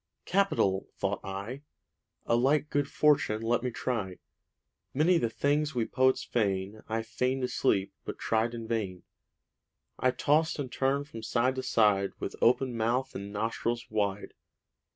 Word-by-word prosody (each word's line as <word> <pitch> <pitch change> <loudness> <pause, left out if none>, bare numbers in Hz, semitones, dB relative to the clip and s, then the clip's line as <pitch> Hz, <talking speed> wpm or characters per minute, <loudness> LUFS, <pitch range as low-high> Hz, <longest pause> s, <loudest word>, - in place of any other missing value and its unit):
'Capital!' 180 - +1
thought 100 0 -1
I. 100 +8 -5 0.6
'A 115 - +2
like 145 +5 +2
good 145 -1 +1
fortune 140 -7 +2
let 120 +1 +1
me 125 - -1
try.' 110 -6 -3 0.8
Many 165 +5 +4
the 115 - 0
things 145 +4 0
we 120 -2 +1
poets 130 +2 +2
feign. 100 -2 -1
I 110 +1 -1
feign'd 125 +4 -1
to - - +2
sleep, 100 -7 +1
but - - -6
tried 115 +1 0
in 115 -1 -6
vain. 100 -6 -2 1.0
I 130 - +3
tost 150 +5 +2
and 135 -4 -4
turn'd 140 +2 0
from 115 -6 -8
side 120 +3 +1
to - - 0
side, 105 -6 +2
With - - -5
open 125 +1 +3
mouth 120 +4 0
and 100 +1 -6
nostrils 115 +2 -2
wide. 105 -2 -1
120 Hz, 150 wpm, -29 LUFS, 105-135 Hz, 1.0 s, Many